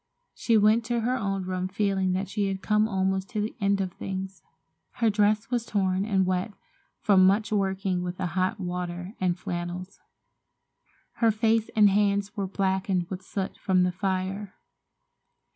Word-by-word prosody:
She 230 -2 +2
went 215 +2 +4
to 235 0 0
her 245 +3 +1
own 195 -5 -2
room 185 0 -2
feeling 190 -1 0
that 190 +2 -1
she 205 -1 -1
had 190 -1 -4
come 210 0 +3
almost 190 -1 -1
to 215 - -3
the 210 +1 -2
end 200 0 +2
of 185 -1 -2
things. 190 0 -6 0.5
Her 230 -2 +2
dress 210 +2 +1
was 240 -2 +1
torn 195 -3 0
and 195 -3 +2
wet 185 +3 -1 0.5
from 195 -3 +5
much 210 +3 +2
working 190 -2 0
with 180 0 -4
the 185 - -2
hot 185 +2 0
water 180 0 -4
and 180 -1 +1
flannels. 175 +1 -5 1.2
Her 230 - +4
face 220 0 +2
and 210 -1 +7
hands 200 0 +1
were 200 -3 -2
blackened 190 -2 -1
with 190 0 -4
soot 190 0 -4
from 185 -1 +2
the 180 - +1
fire. 190 +1 -3
195 Hz, 165 wpm, -27 LUFS, 185-210 Hz, 1.2 s, and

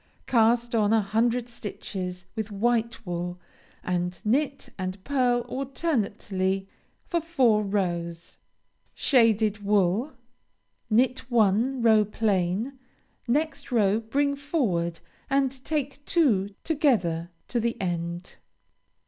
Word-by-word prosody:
Cast 235 0 +3
on 215 -2 +3
a 225 - +5
hundred 230 +4 +1
stitches 185 -5 -6
with 220 -1 -4
white 230 +2 0
wool, 175 0 -4 0.4
and 180 0 -2
knit 275 +5 0
and 185 0 -5
pearl 250 -2 +2
alternately 210 - -2 0.4
for 340 -2 -1
four 260 -10 +3
rows. 175 -5 -3 0.6
Shaded 220 -5 +3
wool 205 +7 +2 0.8
Knit 250 +3 +2
one 235 +3 +2
row 220 -2 +6
plain; 210 +4 -1 0.5
next 285 +2 -1
row 215 -3 +3
bring 280 +6 0
forward, 225 - -1 0.3
and 270 -1 0
take 290 -2 -2
two 205 - +2
together 185 - +1 0.2
to 240 - 0
the 230 0 -1
end. 175 -1 -4
225 Hz, 105 wpm, -26 LUFS, 190-260 Hz, 0.8 s, row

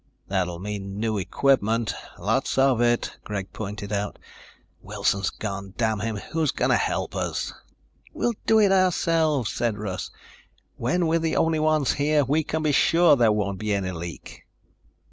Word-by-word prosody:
"That'll 90 -3 -1
mean 100 +1 -5
new 110 -2 0
equipment, 115 -1 +1 0.2
lots 115 +11 0
of 135 -3 +4
it," 120 0 +1
Greg 100 -2 -5
pointed 105 0 -5
out. 100 0 -2 0.6
"Wilson's 100 -1 0
gone, 100 -2 -6
damn 110 -2 +1
him. 110 +1 -2 0.2
Who's 160 -2 +1
going - - +1
to - - +5
help - - -2
us?" - - -2 0.6
"We'll 240 - -1
do 220 - +5
it 205 -2 +4
ourselves," 165 - +2
said 115 -3 -1
Russ. 100 -3 -4 0.7
"When 180 0 0
we're 165 +1 +2
the 160 0 -1
only 160 -1 +2
ones 155 -3 +2
here, 150 0 +3
we 150 +5 +1
can 160 +1 -2
be 155 - +2
sure 165 +2 +5
there 120 -4 +4
won't 100 -2 -1
be 105 -1 0
any 95 -2 -2
leak." 85 -1 -8
115 Hz, 160 wpm, -25 LUFS, 100-155 Hz, 0.7 s, to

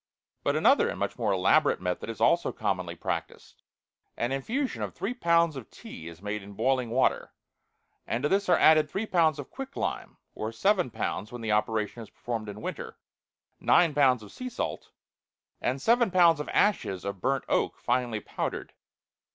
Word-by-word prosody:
But - - +1
another - - +4
and - - -4
much - - -3
more 110 -3 +1
elaborate 100 +11 +3
method 90 +4 -3
is 115 - -6
also - - +3
commonly - - -2
practiced. - - -5 0.6
An 120 +2 -1
infusion 245 - -2
of - - -4
three 215 +5 -3
pounds 170 - +2
of 130 -5 -8
tea 80 - -10
is 85 +2 -11
made 105 0 -3
in 100 +1 -11
boiling 130 +3 0
water, 125 +3 +1 0.7
and 120 +3 -2
to 150 - +2
this 195 0 +1
are 175 - +6
added 155 -1 +5
three 200 +8 -2
pounds 165 -7 +2
of - - -8
quicklime 270 +1 -5 0.2
(or 110 +1 -4
seven 185 - +1
pounds 100 -2 -4
when 120 -1 -7
the 110 -1 -2
operation 105 +1 0
is 110 - -10
performed 115 -3 -5
in 105 +1 -9
winter), - - -6 0.6
nine 170 -3 +4
pounds 130 -5 +3
of 105 - -12
sea 255 0 -6
salt, - - -4 0.7
and 130 +2 -1
seven 235 - +3
pounds 175 -4 +5
of 150 - -5
ashes 100 - +1
of 100 -2 -5
burnt 135 0 0
oak - - 0
finely 120 -3 -1
powdered. - - -5
130 Hz, 175 wpm, -28 LUFS, 110-170 Hz, 0.7 s, are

